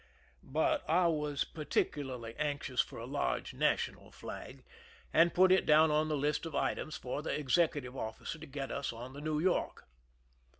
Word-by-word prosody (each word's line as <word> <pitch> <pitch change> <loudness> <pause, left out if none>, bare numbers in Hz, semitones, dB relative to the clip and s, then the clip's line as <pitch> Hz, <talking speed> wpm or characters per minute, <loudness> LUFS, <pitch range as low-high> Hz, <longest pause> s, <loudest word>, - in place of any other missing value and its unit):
But 155 +4 +1
I 175 +3 +4
was 150 -4 +1
particularly 130 -6 -2
anxious 145 -4 0
for - - -8
a - - -6
large - - -2
national - - 0
flag, - - -9 0.5
and 170 +1 +6
put 185 +1 +5
it 190 - +5
down 155 +1 +5
on 155 +1 +2
the 155 - 0
list 145 +1 0
of 160 - -8
litems 155 - -1
for 125 +3 -4
the 155 - -2
executive 145 -3 +1
officer 110 +7 -5
to - - -9
get 135 0 -5
us 140 - -2
on 120 +3 -8
the 145 - -8
New 155 0 -1
York. 180 +3 0
150 Hz, 170 wpm, -33 LUFS, 135-160 Hz, 0.5 s, and